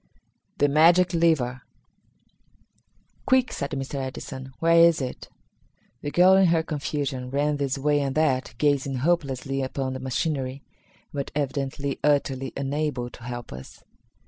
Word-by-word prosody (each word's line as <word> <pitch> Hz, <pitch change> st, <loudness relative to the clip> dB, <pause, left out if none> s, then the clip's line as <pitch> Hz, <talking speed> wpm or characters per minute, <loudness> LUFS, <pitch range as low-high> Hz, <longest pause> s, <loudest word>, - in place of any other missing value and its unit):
The 145 Hz, -, +3 dB
Magic 170 Hz, +5 st, +5 dB
Lever! 155 Hz, -7 st, +1 dB, 1.7 s
"Quick," 260 Hz, -1 st, +3 dB
said 140 Hz, -, -3 dB
Mr. 135 Hz, -1 st, -5 dB
Edison, 130 Hz, 0 st, -6 dB
"where 165 Hz, 0 st, +3 dB
is 170 Hz, -1 st, +6 dB
it?" 130 Hz, -2 st, -6 dB, 0.7 s
The 145 Hz, -, -3 dB
girl 180 Hz, +5 st, +5 dB
in 190 Hz, -1 st, +5 dB
her 165 Hz, -1 st, +2 dB
confusion 140 Hz, -4 st, -3 dB
ran 145 Hz, +2 st, 0 dB
this 140 Hz, -1 st, -1 dB
way 145 Hz, +1 st, +2 dB
and 135 Hz, -1 st, -2 dB
that, 135 Hz, -7 st, +1 dB
gazing 140 Hz, 0 st, +1 dB
hopelessly 135 Hz, -2 st, -1 dB
upon 130 Hz, 0 st, -3 dB
the 130 Hz, -, -5 dB
machinery, 130 Hz, 0 st, -2 dB, 0.5 s
but 140 Hz, -1 st, -3 dB
evidently 140 Hz, -1 st, -2 dB
utterly 135 Hz, -3 st, +1 dB
unable 140 Hz, -3 st, -2 dB
to -, -, -13 dB
help 120 Hz, -, -6 dB
us. 65 Hz, +1 st, -11 dB
140 Hz, 135 wpm, -25 LUFS, 130-155 Hz, 1.7 s, is